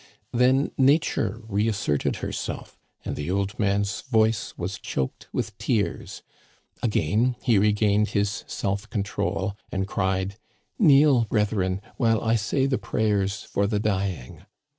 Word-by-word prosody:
Then 130 +3 +3
Nature 130 -6 +2
reasserted 105 -8 0
herself, - - -5 0.3
and - - -3
the 75 +3 -4
old 100 +1 -1
man's 100 0 0
voice 110 -3 +1
was 95 +3 -4
choked 65 - -4
with - - -3
tears. - - -2 0.6
Again 115 +3 +1
he 115 -5 +4
regained 105 0 +3
his 100 -1 -1
self 100 +2 -3
control, 100 -1 -2 0.2
and 95 0 -1
cried: 95 0 -1 0.2
" - - -46
Kneel, 140 - +6
brethren, 100 -4 0 0.2
while 115 -2 +3
I 115 0 +1
say 115 +5 +1
the 135 -2 0
prayers 105 -1 0
for 100 0 0
the 105 -1 0
dying." 95 - -2
105 Hz, 130 wpm, -25 LUFS, 100-115 Hz, 0.6 s, Kneel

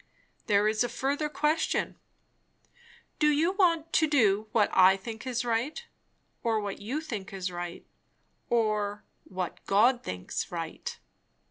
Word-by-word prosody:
"There 205 -1 +4
is 215 +2 +2
a 245 - -2
further 280 +5 -1
question. 300 +2 0 1.2
Do 300 - +4
you 310 +4 +3
want 335 -5 +2
to 315 - +4
do 220 -8 +3
what 215 -3 +3
I 190 +1 +6
think 225 +5 -8 0.2
right, 245 - -1 0.6
or 225 -2 +1
what 205 -1 -5
you 260 +9 -3
think 215 -11 -6 0.2
right, 175 0 -6 0.6
or 210 -3 0 0.2
what 185 -2 -5
God 240 +5 +4
thinks 90 0 -4
right?" - - -5
225 Hz, 125 wpm, -29 LUFS, 205-295 Hz, 1.2 s, I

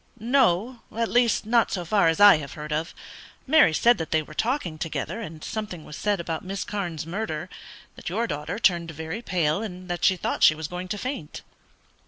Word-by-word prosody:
"No; 235 -1 +2 0.2
at 230 -1 0
least 240 -3 +3
not 230 +1 +3
so 180 -3 -3
far 200 0 +3
as 165 0 +1
I 205 -4 +9
have 145 -2 -7
heard 150 0 -5
of. 160 +3 -3 0.5
Mary 300 - +6
said 235 +8 +4
that 160 - -4
they 155 -1 +1
were 155 - -13
talking 205 - -1
together, 165 +7 -3
and 160 -7 -8
something 210 -7 -5
was 150 - -9
said 205 +2 0
about 165 -2 -4
Miss 195 +1 -4
Carne's 175 -7 -4
murder; 180 -1 -4 0.4
that - - -6
your 220 +7 0
daughter 150 0 -4
turned 175 -6 +2
very 160 +6 -5
pale, 175 -5 0
and 185 -4 -7
that 175 -1 -4
she 190 - +4
thought - - -3
she 155 - +7
was 160 -1 -5
going 180 +2 -6
to 210 - -3
faint." 250 - -5
180 Hz, 205 wpm, -25 LUFS, 160-220 Hz, 0.5 s, I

